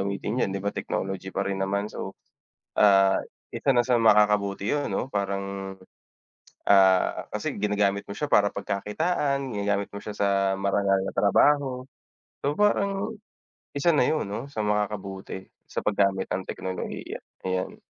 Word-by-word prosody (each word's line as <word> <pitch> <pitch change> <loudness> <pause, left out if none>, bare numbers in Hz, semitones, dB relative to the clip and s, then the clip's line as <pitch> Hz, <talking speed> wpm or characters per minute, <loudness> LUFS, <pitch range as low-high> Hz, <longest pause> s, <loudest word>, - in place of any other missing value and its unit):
gamitin 100 +5 -2
yan - - +2
'di 95 +1 -4
ba, 100 - 0
technology 95 0 -3
pa 95 +1 -2
rin 100 -1 -2
naman? 100 +2 -1
So, - - -6 0.6
ah, 95 -2 +5 0.4
isa 140 - +1
na 120 -2 +3
sa 125 - +3
makakabuti 105 -2 +3
yun, 145 -1 -1
'no, - - -1
parang, 100 -3 -3 0.9
ah, 95 -2 +4
kasi - - -3
ginagamit 100 -1 +1
mo 100 - -6
siya 150 - -1
para 105 -8 +4
pagkakitaan, 140 - -1
ginagamit 100 -1 -1
mo 100 - -6
siya 105 -1 -7
sa 100 - +2 0.3
marangal 100 0 +2
na - - -4
trabaho. 130 +4 +3 0.6
So, 140 - +2
parang 200 +3 +1 0.6
isa 140 +4 +1
na 150 -6 +4
yun, 155 -10 0
'no, 115 +6 -4
sa 110 - -2
makakabuti 100 -2 -3 0.2
sa - - -4
paggamit 100 -2 +1
ng 90 +1 -2
teknolohiya, 95 0 -5 0.2
ayan. 95 0 -3
100 Hz, 145 wpm, -26 LUFS, 100-125 Hz, 0.9 s, ah